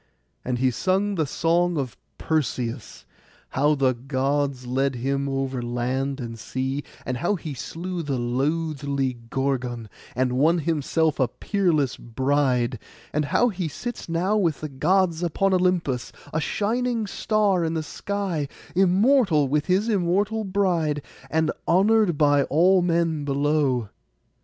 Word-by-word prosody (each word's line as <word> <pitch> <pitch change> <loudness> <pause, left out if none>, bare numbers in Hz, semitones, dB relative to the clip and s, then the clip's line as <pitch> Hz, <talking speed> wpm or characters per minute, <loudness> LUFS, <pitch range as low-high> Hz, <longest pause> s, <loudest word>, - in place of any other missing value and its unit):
And 125 -1 -1
he 130 +1 +2
sung 190 - 0
the 160 -6 0
song 170 +3 +1
of 135 -4 -3 0.2
Perseus, 125 -6 -2 0.4
how 150 +3 +2
the 135 -2 +2
Gods 135 +1 -1
led 135 +2 0
him 140 +3 -1
over 135 -2 -2
land 130 +3 -2
and 115 -2 -6
sea, 130 +5 -3 0.2
and 125 - -2
how 175 +10 0
he 160 -5 -6
slew 175 +7 -5
the 140 -4 -2
loathly 140 0 -1
Gorgon, 125 -4 -2 0.3
and 125 0 +1
won 165 +5 +4
himself 160 -1 0
a 130 - +3
peerless 165 - 0
bride; 130 -1 0 0.3
and 150 0 +1
how 245 +11 +3
he 185 -5 -3
sits 240 - -6
now 180 +5 +1
with 170 -8 0
the 155 - -4
Gods 170 +4 +1
upon 190 +3 +1
Olympus, 180 -9 +1 0.2
a 160 - 0
shining 230 +5 0
star 205 -2 +1
in 165 0 -1
the 160 - -1
sky, 190 -3 -3 0.3
immortal 190 - +4
with 150 +2 0
his 190 +4 +2
immortal 205 +2 +1
bride, 175 -7 0 0.3
and 160 0 +1 0.2
honoured 195 -1 +4
by 145 -1 +4
all 180 +5 +4
men 165 -3 +1
below. 140 -5 +1
150 Hz, 140 wpm, -24 LUFS, 135-180 Hz, 0.4 s, won